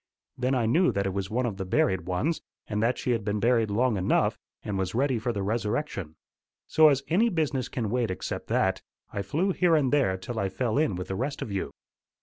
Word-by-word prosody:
Then 130 +1 0
I 120 -3 +1
knew 165 +11 +3
that 100 0 0
it 95 - -1
was 100 -1 -3
one 125 +3 0
of 110 -5 -3
the 95 - -3
buried 95 -1 +1
ones, 130 - 0 0.2
and 105 -1 -2
that 120 +3 +2
she 125 - -1
had 115 -3 0
been 105 0 -1
buried 115 -1 +2
long 115 +2 +1
enough, 95 - +1 0.2
and 105 - -3
was 95 +1 -2
ready 130 -1 +1
for 120 +2 -1
the 100 -3 -3
resurrection. 105 - -2 0.5
So 155 0 +6
as 140 -1 +1
any 210 +8 +3
business 145 - -1
can 110 -5 -3
wait 120 -2 +1
except 95 - -4
that, - - +1 0.3
I 100 - -2
flew 160 - 0
here 175 -2 +3
and 145 -3 +2
there 125 -11 +3
till 110 +5 -5
I 100 - 0
fell 115 +5 0
in 155 -11 +1
with 90 0 -5
the 95 - -2
rest 135 +7 -2
of 105 - -7
you. 95 -1 -2
115 Hz, 230 wpm, -27 LUFS, 100-135 Hz, 0.5 s, So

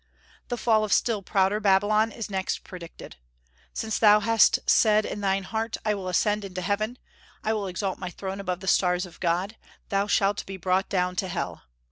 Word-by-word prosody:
The 245 - -3
fall 220 -2 +2
of 210 - -3
still 225 -4 +2
prouder 195 +1 +1
Babylon 210 +2 +3
is 225 0 -6
next 190 -2 -3
predicted. 170 - -11 0.5
"Since 220 -1 -3
thou 210 -1 +6
hast 225 0 +4
said 215 -1 +4
in 205 - -5
thine 195 -1 0
heart, 220 +3 -3
I 215 - +2
will 195 -2 -5
ascend 205 +3 +1
into 185 -2 -6
heaven, 215 +6 -1 0.5
I 220 - +1
will 205 -2 -2
exalt 190 +1 -3
my 180 - -4
throne 190 +2 -6
above 185 -2 -3
the 190 - -8
stars 180 0 +2
of 175 - -15
God, 185 +5 -1 0.3
thou 200 +1 +1
shalt 200 0 +1
be 195 0 -6
brought 185 +2 0
down 180 -1 0
to 190 - 0
hell.... 175 - -5
200 Hz, 190 wpm, -26 LUFS, 185-215 Hz, 0.5 s, thou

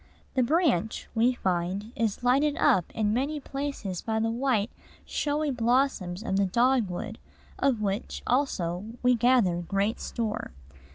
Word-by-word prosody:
"The 260 - +2
branch," 250 - +1
we 240 +2 +3
find, 185 +2 -2
is 225 0 -1
lighted 280 +4 +3
up 180 -3 +3
in 210 -1 +1
many 280 +5 -1
places 275 -10 -4
by 220 -1 -1
the 225 0 +1
white, 240 -3 0 0.3
showy 295 0 -1
blossoms 235 -6 +1
of 195 -4 -1
the 200 -1 +3
dogwood, 225 -2 +1 0.4
of 250 -6 +1
which, 200 +1 -3
also, 190 -10 0 0.2
we 250 0 +5
gather 240 -7 +3
great 195 +6 -1
store. 220 - -3
230 Hz, 135 wpm, -27 LUFS, 195-260 Hz, 0.4 s, we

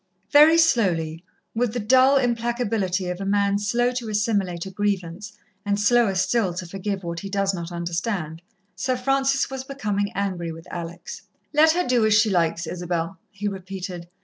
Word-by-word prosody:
Very 300 +3 +7
slowly, 180 - +2 0.3
with 230 -1 0
the 245 - -2
dull 260 +5 +5
implacability 230 -6 0
of 180 +2 -6
a - - -2
man 200 0 +1
slow 240 +4 +1
to 245 -3 -4
assimilate 200 -5 0
a 190 - -7
grievance, 200 0 -3 0.3
and 205 0 0
slower 215 -1 +3
still 190 -1 +1
to 185 - -4
forgive 195 +2 -4
what 170 0 -4
he 195 - -7
does 195 0 0
not 170 -1 -5
understand, 170 -1 -3 0.3
Sir 255 -1 -1
Francis 270 +1 +1
was 265 -1 -4
becoming 210 -7 -2
angry 185 -4 -2
with 165 0 -10
Alex. 170 0 -7 0.3
"Let 315 +2 +5
her 360 +1 0
do 245 -2 +3
as 215 -1 +4
she 215 0 +4
likes, 170 -1 +1
Isabel," 175 +1 -3
he 205 0 -5
repeated. 185 -2 -6
200 Hz, 170 wpm, -23 LUFS, 175-240 Hz, 0.3 s, Very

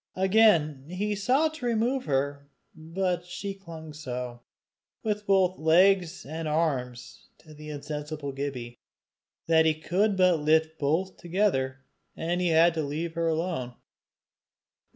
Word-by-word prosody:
Again 185 -8 +3
he 205 +4 -2
sought 260 +10 +1
to 250 - -6
remove 240 +3 0
her, 140 0 -1 0.2
but 175 +2 -2
she 195 +3 -5
clung 165 -5 -10
so, 125 -5 -6 0.6
with 210 -1 -2
both 190 -2 +3
legs 180 +2 +3
and 160 +3 -5
arms, 135 -6 -2
to 155 - -16
the 150 0 -10
insensible 150 0 -5
Gibbie, 130 -4 -5 0.7
that 160 -1 +4
he 155 - +2
could 190 +6 0
but 180 -3 +4
lift 160 +1 +2
both 165 +6 0
together, 135 -8 -1 0.3
and 175 +2 -2
had 170 -1 +4
to 160 - -1
leave 155 +3 -3
her 165 0 -1
alone. 160 -7 -2
160 Hz, 130 wpm, -27 LUFS, 150-185 Hz, 0.7 s, that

